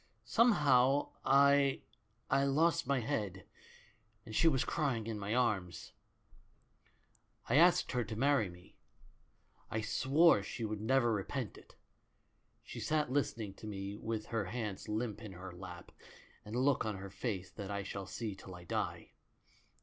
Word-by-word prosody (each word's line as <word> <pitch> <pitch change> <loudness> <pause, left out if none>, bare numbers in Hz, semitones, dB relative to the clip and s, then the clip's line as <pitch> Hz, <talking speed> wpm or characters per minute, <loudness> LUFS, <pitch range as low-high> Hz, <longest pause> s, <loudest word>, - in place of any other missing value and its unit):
Somehow 145 - +4
I 140 0 +4 0.2
— 110 +2 -25
I 135 +1 +4
lost 150 +4 +2
my 140 -2 +1
head, 100 -5 -3 0.8
and 110 -2 -8
she 165 - +4
was 135 -6 +3
crying 135 -8 -1
in 110 -2 -4
my 100 +3 -2
arms. 100 -8 -1 1.5
"I - - +3
asked 175 +2 +5
her 125 -2 0
to 110 +1 -6
marry 130 -4 +2
me. 90 +1 -16 0.9
I 110 - -2
swore 135 +5 +4
she 105 +4 -6
should 105 -1 -3
never 120 0 +3
repent 110 +3 -3
it. - - -17 0.9
She - - -8
sat 150 -4 0
listening 115 -7 -1
to 110 - -10
me 100 -1 -5
with 110 0 -4
her 115 -3 -2
hands 105 -1 -5
limp 110 0 -2
in 105 -4 -8
her 95 +1 -8
lap, 90 -1 -10 0.5
and 105 +2 -7
a - - +1
look 135 0 +3
on 110 -3 -3
her 95 0 -8
face 95 -2 -4
that 100 -3 -7
I 100 -1 -3
shall 100 -1 -6
see 110 -4 -4
till 95 -1 -11
I 90 - -11
die. 85 - -3
110 Hz, 155 wpm, -34 LUFS, 100-135 Hz, 1.5 s, asked